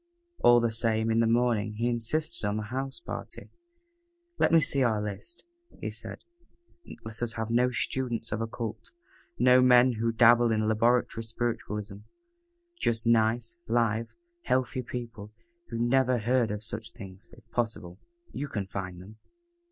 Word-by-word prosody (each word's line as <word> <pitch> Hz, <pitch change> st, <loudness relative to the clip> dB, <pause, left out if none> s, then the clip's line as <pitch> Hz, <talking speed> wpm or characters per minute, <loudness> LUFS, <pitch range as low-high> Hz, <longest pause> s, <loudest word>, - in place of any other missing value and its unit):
All 120 Hz, 0 st, +6 dB
the 115 Hz, -1 st, +1 dB
same, 110 Hz, 0 st, +1 dB
in 115 Hz, -, +2 dB
the 115 Hz, -, +3 dB
morning, 115 Hz, -2 st, +1 dB
he 115 Hz, +3 st, -1 dB
insisted 120 Hz, +6 st, -1 dB
on 105 Hz, +1 st, -1 dB
the 105 Hz, +1 st, -5 dB
house 135 Hz, +1 st, -3 dB
party. -, -, -8 dB, 0.9 s
"Let -, -, +3 dB
me 165 Hz, -, +7 dB
see 140 Hz, -2 st, +2 dB
our 115 Hz, -4 st, +2 dB
list," 105 Hz, -, -6 dB, 0.3 s
he -, -, -4 dB
said. -, -, -6 dB, 0.8 s
"Let 110 Hz, +1 st, -9 dB
us 120 Hz, -1 st, -1 dB
have 110 Hz, 0 st, -4 dB
no 125 Hz, +2 st, +3 dB
students 120 Hz, -1 st, -2 dB
of 110 Hz, -, -2 dB
occult; 115 Hz, -1 st, -5 dB, 0.4 s
no 125 Hz, +1 st, +6 dB
men 125 Hz, 0 st, +6 dB
who 115 Hz, +1 st, +1 dB
dabble 120 Hz, +1 st, +5 dB
in 110 Hz, -1 st, +1 dB
laboratory 115 Hz, +1 st, +2 dB
spiritualism; 110 Hz, -3 st, -3 dB, 0.8 s
just 115 Hz, 0 st, 0 dB
nice, 115 Hz, +5 st, +2 dB
live, 115 Hz, -1 st, 0 dB, 0.3 s
healthy 130 Hz, -, 0 dB
people 115 Hz, -4 st, -7 dB, 0.3 s
who -, -, -5 dB
never 125 Hz, +1 st, +2 dB
heard 120 Hz, +1 st, +1 dB
of 105 Hz, +1 st, -4 dB
such 115 Hz, 0 st, -6 dB
things 100 Hz, -2 st, -11 dB
if 115 Hz, -1 st, -18 dB
possible. 105 Hz, -6 st, -3 dB, 0.3 s
You 145 Hz, -, -4 dB
can 105 Hz, -7 st, -3 dB
find 95 Hz, -2 st, -6 dB
them." 105 Hz, +4 st, -13 dB
115 Hz, 150 wpm, -28 LUFS, 110-120 Hz, 0.9 s, me